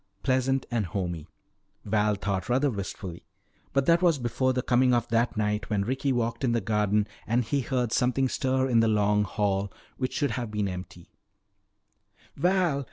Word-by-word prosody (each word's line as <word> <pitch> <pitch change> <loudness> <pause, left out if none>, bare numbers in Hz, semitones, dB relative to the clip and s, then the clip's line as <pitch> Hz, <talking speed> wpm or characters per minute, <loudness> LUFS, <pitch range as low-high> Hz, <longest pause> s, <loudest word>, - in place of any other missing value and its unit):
Pleasant 130 0 +1
and 115 -5 0
homey, 85 -3 -4 0.6
Val 105 0 +2
thought 100 +2 -3
rather 135 +3 +2
wistfully. 95 -4 -6 0.5
But 135 0 +1
that 170 +2 +4
was 170 -4 +4
before 130 +1 0
the 125 -1 -1
coming 125 0 +3
of 120 - 0
that 115 0 +1
night 105 -1 -1
when 105 -3 +1
Ricky 135 +3 -1
walked 120 0 -1
in 120 -3 +2
the 115 - +2
garden 105 0 +1 0.2
and 120 +3 +2
he 140 +5 0
heard 125 -2 -1
something 125 +2 +2
stir 130 0 0
in 120 -3 +3
the 115 - +4
Long 105 -1 +2
Hall 100 -1 -1 0.3
which 130 -1 -2
should 145 - 0
have 120 -3 -3
been 105 -1 -1
empty 90 -2 -8 1.2
"Val! 175 -2 +2
115 Hz, 170 wpm, -27 LUFS, 105-130 Hz, 1.2 s, that